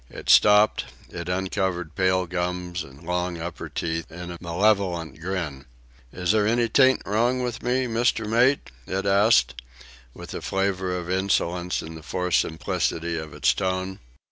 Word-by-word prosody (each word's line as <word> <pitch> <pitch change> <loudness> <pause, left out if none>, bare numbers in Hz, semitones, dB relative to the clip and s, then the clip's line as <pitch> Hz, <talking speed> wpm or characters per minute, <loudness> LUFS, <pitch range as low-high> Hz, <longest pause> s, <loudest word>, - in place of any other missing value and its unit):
It - - -1
stopped; 105 +1 +5 0.2
it 85 0 -6
uncovered 90 -3 -2
pale 95 +1 +2
gums 90 0 -3
and 70 0 -15
long, 90 0 -2
upper 85 +1 -6
teeth 80 0 -3
in 90 +1 -7
a 85 - -7
malevolent 90 -3 0
grin. 85 -7 -4 0.5
"Is 90 0 0
there 105 -1 +2
any 120 +1 +2
think 130 -1 +4
wrong 120 +5 +1
with 120 -1 -3
me, 125 +1 +1
Mister 115 -1 +1
Mate?" 120 - +2 0.2
it 95 +1 -2
asked, 100 - +3 0.5
with - - -9
a - - -5
flavour 95 -1 -1
of 90 -1 -6
insolence 90 -1 0
in 80 - -8
the 80 - -9
forced 90 +3 0
simplicity 80 +1 -2
of 80 -1 -5
its - - +2
tone. 95 0 -2
90 Hz, 155 wpm, -25 LUFS, 85-105 Hz, 0.5 s, stopped